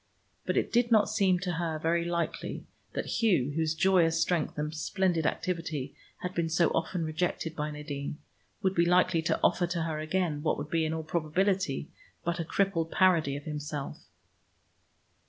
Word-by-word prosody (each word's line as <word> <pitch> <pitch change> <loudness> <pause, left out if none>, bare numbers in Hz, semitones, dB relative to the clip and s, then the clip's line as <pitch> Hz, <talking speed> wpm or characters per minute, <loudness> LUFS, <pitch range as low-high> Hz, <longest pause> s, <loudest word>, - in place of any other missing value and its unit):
But - - +1
it - - 0
did 240 0 +3
not 215 -2 +5
seem 195 -4 +3
to 180 -1 -1
her 165 -2 -2
very 165 +2 +1
likely 170 -1 -3 0.3
that - - -2
Hugh, 175 - +3
whose 160 +1 0
joyous 175 -2 +3
strength 170 -5 0
and 150 +1 -2
splendid 170 0 0
activity 160 -6 -2 0.3
had 180 0 -3
been 170 -2 0
so 165 +1 +3
often 170 0 -1
rejected 160 0 -2
by 150 0 -2
Nadine, 150 -1 -5 0.5
would 190 -1 +2
be 170 -2 +3
likely 180 -1 +4
to 160 - 0
offer 175 - +3
to 170 -1 -1
her 160 -2 -2
again 155 -1 -1
what 155 - +1
would 145 +2 -6
be, 165 -1 +2
in 155 - -1
all 160 - -3
probability, 170 0 0 0.3
but 170 0 -1
a - - 0
crippled 165 -1 0
parody 165 -7 +3
of 145 - -8
himself. 150 -2 -5
165 Hz, 175 wpm, -29 LUFS, 155-180 Hz, 0.5 s, not